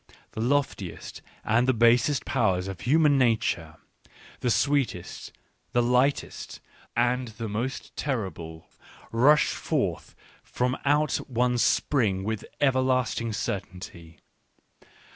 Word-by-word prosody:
The 110 - -5
loftiest 125 -8 -2 0.2
and 120 +3 +2
th 130 -3 +2
basest 120 +5 +3
powers 95 -8 +1
of 95 -2 -7
human 145 +1 +4
nature, 110 -10 +1 0.6
the 125 - -1
sweetest, 135 -8 -1 0.4
the 120 - +3
lightest, 125 +4 0 0.4
and 125 +1 +1
the 115 0 -6
most 115 +6 -4
terrible, 85 - -4 0.4
rush 135 +6 +4
forth - - -2 0.3
from 125 +1 -1
out 145 0 +2
one 125 0 +1
spring 105 -8 +1
with 110 0 -3 0.2
everlasting 130 -4 +1
certainty. 90 -5 -6
120 Hz, 105 wpm, -26 LUFS, 100-130 Hz, 0.6 s, human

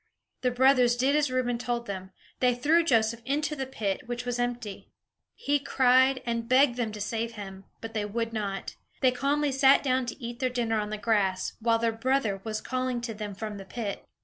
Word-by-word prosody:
The 255 - +2
brothers 250 -1 +4
did 265 +4 +2
as 300 -2 +2
Reuben 250 -2 0
told 240 -1 -2
them; 190 -2 -6 0.3
they 250 -1 +3
threw 310 +7 +3
Joseph 230 -5 +2
into 295 +4 -1
the 265 -2 -4
pit, 205 -7 -2
which 240 0 -4
was 245 0 -2
empty. 245 -4 -3 0.5
He 290 0 +1
cried, 260 -1 +3
and 230 -1 -2
begged 260 -1 +5
them 235 -3 -2
to 210 - -7
save 225 +2 -2
him; 195 -3 -9 0.2
but 225 0 -7
they 210 -2 -1
would 230 +2 -3
not. 200 -3 -4 0.3
They 255 - +5
calmly 280 +3 0
sat 270 +1 +5
down 260 -2 +1
to 235 - -6
eat 235 -1 -6
their 255 -1 +1
dinner 230 -3 0
on 210 0 -3
the 215 - -3
grass, 205 -3 0
while 230 0 +2
their 230 0 +1
brother 225 -4 0
was 215 -1 -3
calling 255 -1 -2
to 235 -1 -4
them 210 -2 -6
from 210 0 -5
the 195 - -9
pit. 205 0 -5
240 Hz, 205 wpm, -28 LUFS, 220-260 Hz, 0.5 s, begged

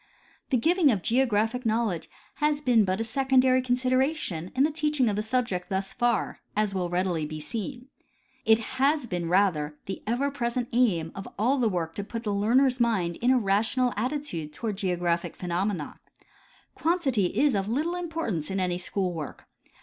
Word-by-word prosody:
The 260 - +3
giving 330 +5 +3
of 205 -8 +1
geographic 235 -1 +1
knowledge 220 -7 0 0.3
has 295 0 +1
been 245 -7 +3
but 185 +1 -1
a - - 0
secondary 260 +1 +3
consideration 255 - 0
in 265 - +4
the 305 - +2
teaching 300 -4 +1
of 205 - -1
the 210 - 0
subject 220 -5 -1
thus 195 0 -2
far, 240 -3 0 0.2
as 210 -1 +1
will 180 -2 -1
be - - -8
readily 165 -4 -1
seen. 235 - -5 0.6
It 220 0 +5 0.2
has 285 +1 +3
been, 175 -6 -3
rather, 165 -6 +2
the 195 - -5
ever 260 +5 0
present 240 -3 -2
aim 190 -10 +2
of 195 - -7
all 255 +7 +2
the 235 -3 +3
work 165 -4 -2
to 205 - -4
put 230 +3 -6
the 210 -3 -1
learner's 250 +6 +3
mind 195 -8 +1
in 245 - +1
a 260 - +5
rational 225 +4 +1
attitude 215 - -3
toward 215 -4 -4
geographic 175 -3 -1
phenomena. 180 -2 -2 0.7
Quantity 300 - +1
is 290 -2 +4
of 195 0 -1
little 305 +9 0
importance 325 - -3
in 195 0 -1
any 180 -1 -1
school 185 0 -2
work. 155 -4 -7
225 Hz, 175 wpm, -27 LUFS, 185-255 Hz, 0.7 s, It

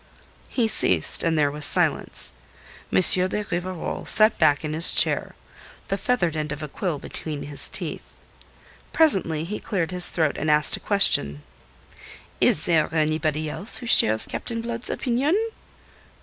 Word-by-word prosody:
He 235 -4 -1
ceased, 90 - 0
and 165 -1 -1
there 145 -2 +1
was 150 +1 -6
silence. - - 0 0.6
M. 95 - +2
de 185 - +4
Rivarol 180 0 -5
sat 215 +1 +4
back 155 -1 +1
in 155 - -5
his 160 +2 +6
chair, - - +1 0.5
the 195 - -1
feathered 195 -5 -2
end 155 -1 -4
of 150 +1 -7
a - - -5
quill 165 +2 -4
between 150 +1 -5
his 145 -1 -4
teeth. - - -5 0.8
Presently 185 - +2
he 205 +6 -6
cleared 185 -4 -4
his 180 -1 +5
throat 160 -4 -2
and 155 - -3
asked 150 0 +3
a - - -10
question. 75 - +1 1.0
"Is 150 - +3
there 165 -3 +1
anybody 155 0 -2
else 195 +8 +2
who 245 - -5
shares 110 - +5
Captain 230 -2 -6
Blood's 235 +1 -5
opinion?" 270 +8 -1
165 Hz, 150 wpm, -22 LUFS, 150-205 Hz, 1.0 s, his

